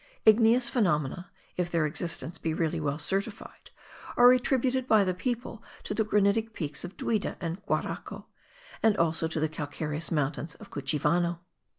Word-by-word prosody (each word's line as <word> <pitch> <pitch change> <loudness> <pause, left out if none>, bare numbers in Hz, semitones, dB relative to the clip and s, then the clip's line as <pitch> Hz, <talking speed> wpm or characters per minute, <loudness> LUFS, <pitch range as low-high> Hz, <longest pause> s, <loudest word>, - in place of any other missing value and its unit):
Igneous 230 +3 +6
phenomena 175 - 0 0.3
(if 180 -1 0
their 165 -2 +1
existence 165 +2 -2
be 160 -1 -2
really 165 0 -1
well 145 -2 -1
certified) 195 +7 -3 0.5
are 245 0 +8
attributed 255 0 +1
by 215 -4 +5
the 185 -1 0
people 230 +3 -4 0.2
to - - -3
the 220 - +1
granitic 210 +2 +1
peaks 150 -6 -4
of 180 +2 -8
Duida 215 -3 -1
and 175 +3 -5
Guaraco, - - -3 0.6
and 220 -2 +3
also 165 -1 +1
to 160 0 -3
the 155 - +1
calcareous 150 +1 -4
mountain 150 -1 -1
of - - -13
Cuchivano. 165 +5 0
175 Hz, 155 wpm, -28 LUFS, 155-220 Hz, 0.6 s, are